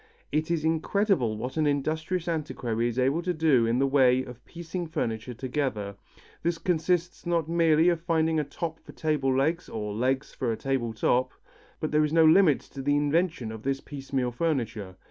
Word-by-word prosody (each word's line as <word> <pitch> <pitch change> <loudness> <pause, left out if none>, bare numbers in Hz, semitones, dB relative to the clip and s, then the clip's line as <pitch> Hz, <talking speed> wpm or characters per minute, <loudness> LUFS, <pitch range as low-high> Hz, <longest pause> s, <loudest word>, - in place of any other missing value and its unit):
It 155 +1 0
is 165 -2 0
incredible 160 - +1
what 125 +6 -5
an 155 -1 +2
industrious 155 +5 -1
antiquary 125 -8 -1
is 120 0 -4
able 135 +6 +2
to 180 0 -2
do 145 -7 +3
in 115 +1 +1
the 135 - +3
way 130 -2 +4
of 125 -1 -11
piecing 170 +1 -6
furniture 115 -5 -3
together. 125 -6 -3 0.5
This 170 0 0
consists 175 0 0
not 170 -3 +1
merely 165 -1 +3
of 170 -2 0
finding 160 -1 +1
a - - +1
top 160 +3 -5
for - - -14
table 150 -4 0
legs, 160 +6 0
or 105 -2 -4
legs 130 +5 -1
for 125 -4 -2
a 110 - -2
table 130 -4 -1
top, 125 +3 +1 0.5
but 155 - -2
there 150 0 +3
is 150 0 -1
no 165 -1 +6
limit 160 -2 +5
to 135 - -9
the 145 +2 +1
invention 145 -5 0
of 110 -1 -8
this 135 +2 -1
piecemeal 135 -4 -3
furniture. 115 - -2
145 Hz, 185 wpm, -27 LUFS, 125-165 Hz, 0.5 s, no